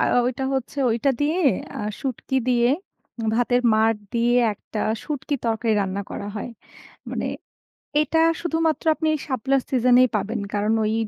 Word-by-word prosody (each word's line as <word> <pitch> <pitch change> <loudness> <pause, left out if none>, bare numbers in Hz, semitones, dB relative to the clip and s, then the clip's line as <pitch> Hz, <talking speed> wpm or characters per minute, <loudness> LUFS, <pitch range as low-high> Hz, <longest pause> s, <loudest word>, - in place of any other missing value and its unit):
আ - - +3 0.2
ঐটা 255 +2 -2
হচ্ছে 265 +2 -3
ঐটা 235 +5 +2
দিয়ে, 310 +4 +1 0.4
আ - - -4 0.2
শুটকি 265 0 -3
দিয়ে, 240 -1 +3 0.7
ভাতের 245 +1 +2
মাড় 220 +1 +3 0.2
দিয়ে 235 +1 +2 0.2
একটা 210 - -8 0.2
শুঁটকি 290 -1 -3
তরকারি 225 0 +1
রান্না 195 0 -2
করা 200 - -5
হয়। 210 - -5 0.6
মানে - - -2 0.7
এটা 315 +2 +1 0.2
শুধুমাত্র 325 -2 0
আপনি 315 -1 0 0.2
শাপলার 265 0 +1
সিজন 250 -1 +4
এই 255 - +5
পাবেন। 215 +2 -1
কারণ 210 +2 +1
ওই 215 - 0
245 Hz, 145 wpm, -23 LUFS, 225-275 Hz, 0.7 s, এই